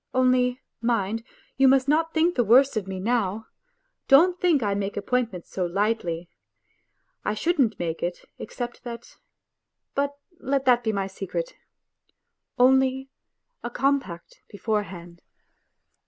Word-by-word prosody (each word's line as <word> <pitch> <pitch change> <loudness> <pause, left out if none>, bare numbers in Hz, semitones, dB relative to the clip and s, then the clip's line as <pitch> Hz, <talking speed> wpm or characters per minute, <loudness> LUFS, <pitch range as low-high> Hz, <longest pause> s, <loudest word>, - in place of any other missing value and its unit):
Only, 255 -1 +3 0.2
mind, 225 -2 0 0.3
you 270 0 +5
must 265 0 +4
not 320 +3 +2
think 330 +2 +2
the 245 - +2
worse 255 +5 +5
of 210 -3 -2
me 190 -1 -5
now! 220 0 -1 0.6
Don't 350 +6 +5
think 330 -8 +3
I 200 -1 +1
make 200 0 -3
appointments 225 -4 -2
so 185 - -2
lightly.... 180 -3 -1 1.0
I 210 - -1
shouldn't 265 - +1
make 165 -1 -3
it 175 +1 -4
except 240 -1 -6
that... 235 -1 -9 0.8
But 285 0 -1 0.2
let 275 0 -1
that 245 -1 +4
be 220 - +1
my 200 -2 -1
secret! 195 - -5 1.0
Only 265 +1 +3 0.5
a 240 - -3
compact 255 -9 -2
beforehand 185 -5 -4
240 Hz, 125 wpm, -25 LUFS, 200-265 Hz, 1.0 s, you